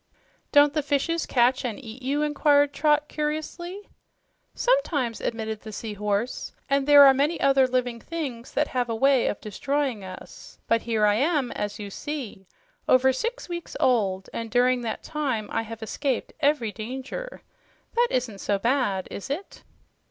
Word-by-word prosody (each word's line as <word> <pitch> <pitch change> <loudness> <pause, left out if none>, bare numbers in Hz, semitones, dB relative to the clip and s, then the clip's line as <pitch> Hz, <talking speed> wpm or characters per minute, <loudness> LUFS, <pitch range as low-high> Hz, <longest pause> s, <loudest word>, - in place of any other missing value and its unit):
"Don't 290 -1 +6
the 305 - +1
fishes 295 +4 0
catch 250 +1 +3
and 235 -5 -3
eat 235 -1 -10
you?" 280 +3 0
inquired 290 -1 +3
Trot 300 0 +2
curiously. 325 +6 -4 0.7
"Sometimes," 320 - +1
admitted 220 -1 -3
the 220 - -9
Sea 215 +1 -5
Horse, 210 +3 -2
"and 275 0 +1
there 290 -1 +9
are 270 - +8
many 290 +5 +1
other 270 -1 +4
living 250 -2 -1
things 265 -6 -5
that - - +1
have 250 -2 -1
a 230 - -1
way 270 +1 +3
of - - -2
destroying 260 +1 -2
us. 185 -1 -11
But 230 0 +2
here 220 -2 +1
I 205 - +4
am, 285 -1 +1
as 205 0 -4
you 205 -1 -7
see, 245 -8 -6 0.4
over 260 +1 +5
six 470 - -3
weeks 345 -1 -6
old, 195 -7 +1
and 230 -1 -4
during 245 +2 +3
that 225 -2 -4
time 265 -8 -2
I - - 0
have 225 0 -8
escaped 265 +3 -2
every 285 -7 +2
danger. 265 - -6 0.5
That 480 +1 +3
isn't 235 -6 -2
so 200 - 0
bad, 230 -4 0
is 200 - -7
it?" 325 +8 -5
255 Hz, 165 wpm, -25 LUFS, 225-295 Hz, 0.7 s, there